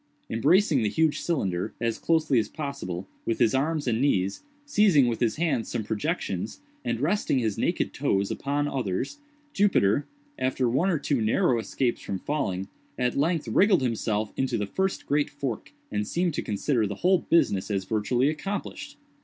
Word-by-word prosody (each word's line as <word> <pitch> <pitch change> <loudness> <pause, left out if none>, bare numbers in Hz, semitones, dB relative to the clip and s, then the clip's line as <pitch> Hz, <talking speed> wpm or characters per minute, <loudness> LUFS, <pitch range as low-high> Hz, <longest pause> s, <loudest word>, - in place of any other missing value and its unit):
Embracing 150 - +3
the 105 - +1
huge 155 +4 +1
cylinder, 95 - -1
as 115 -1 -1
closely 155 -6 +2
as 110 - -2
possible, 120 - -5 0.2
with 115 - -1
his 115 -3 +3
arms 150 +2 0
and 115 0 +1
knees, 100 -8 +1 0.2
seizing 205 - +4
with 120 -2 -1
his 115 -3 +1
hands 150 -8 0
some 110 - -2
projections, 105 -1 -3 0.2
and 120 -1 -1
resting 165 +1 +1
his 110 -5 0
naked - - -1
toes 100 0 0
upon 145 +1 -1
others, 130 - -2 0.3
Jupiter, 145 - +3 0.3
after 130 -1 +1
one 135 +11 +2
or 175 - +2
two 140 -4 0
narrow 120 - +2
escapes 120 +3 -1
from 95 - -3
falling, 95 -8 -2 0.3
at 125 -1 0
length 155 0 +1
wriggled 185 - +4
himself 110 -3 -1
into 130 -3 0
the 105 - -1
first 190 - -2
great 145 0 +1
fork, 140 -5 -5 0.2
and 105 0 -1
seemed 175 -1 0
to - - -2
consider 110 +2 0
the 100 - -4
whole 185 0 +5
business 100 - +2
as 100 -2 0
virtually 115 +6 +1
accomplished. 200 - -4
130 Hz, 170 wpm, -26 LUFS, 110-155 Hz, 0.3 s, whole